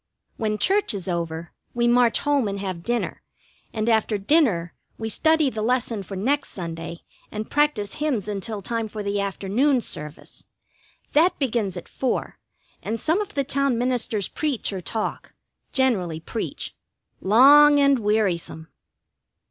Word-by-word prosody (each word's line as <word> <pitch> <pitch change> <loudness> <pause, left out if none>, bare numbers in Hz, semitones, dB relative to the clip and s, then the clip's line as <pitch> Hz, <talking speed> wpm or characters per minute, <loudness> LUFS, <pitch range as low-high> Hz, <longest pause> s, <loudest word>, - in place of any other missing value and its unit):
When 215 -1 -1
church 390 - +2
is 195 -1 -5
over 170 -2 -3 0.2
we 240 0 +2
march 240 -2 +4
home 285 -5 +2
and 200 0 -3
have 185 -3 -4
dinner, 240 +6 -2 0.5
and 215 0 -2
after 220 -2 +2
dinner 200 - +2 0.2
we 225 0 -4
study 315 +4 +3
the 220 - -4
lesson 235 -2 0
for 195 +1 -8
next 275 +9 0
Sunday 170 -1 -6 0.3
and 215 0 -5
practise 290 -9 +1
hymns 270 -10 -1
until 205 0 -4
time 230 +1 -2
for 210 -1 -6
the 200 0 -1
afternoon 205 +8 +1
service. 150 -9 -8 0.7
That 330 +5 +4
begins 225 - -1
at 175 - -8
four, 260 - -3 0.4
and 225 +2 -3
some 325 - +1
of 415 - -7
the 280 - +1
town 275 -2 +1
ministers 235 -4 0
preach 285 -9 -2
or 190 - -4
talk, 220 +4 -4 0.4
generally 195 - +1
preach, 215 +7 -5 0.5
long 285 +8 +7
and 280 -2 +4
wearisome. 195 -7 -1
220 Hz, 145 wpm, -24 LUFS, 195-270 Hz, 0.7 s, long